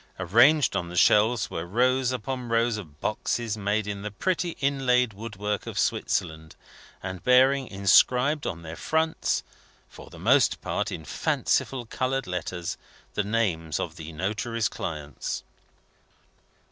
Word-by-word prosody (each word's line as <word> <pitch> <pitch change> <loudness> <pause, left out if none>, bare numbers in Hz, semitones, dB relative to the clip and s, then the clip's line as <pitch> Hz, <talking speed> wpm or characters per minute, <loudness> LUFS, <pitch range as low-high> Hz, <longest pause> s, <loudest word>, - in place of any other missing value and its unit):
Arranged 120 - +4
on 85 - -2
the 90 - -8
shelves, 110 +3 +4
were 80 - -3
rows 125 +7 +2
upon 125 0 -4
rows 115 0 +2
of 75 -8 -10
boxes 115 +1 -1
made 105 0 -1
in 100 -1 -4
the 105 - -4
pretty 170 - -2
inlaid 125 -4 +2
woodwork 105 -1 -4
of - - -6
Switzerland, 80 0 -1 0.5
and 95 -1 -6
bearing 130 +1 +4
inscribed 125 +9 +3
on 85 -2 -5
their 80 0 -7
fronts 160 - 0 0.5
(for - - -13
the - - -13
most - - +3
part - - -2
in 80 - -6
fanciful 125 - 0
coloured 130 +3 -2
letters) 90 -1 -4 0.4
the - - 0
names 95 -8 -1
of - - -4
the 80 +1 -8
notary's 105 +7 -1
clients. 75 -4 -5
110 Hz, 135 wpm, -26 LUFS, 90-125 Hz, 0.5 s, Arranged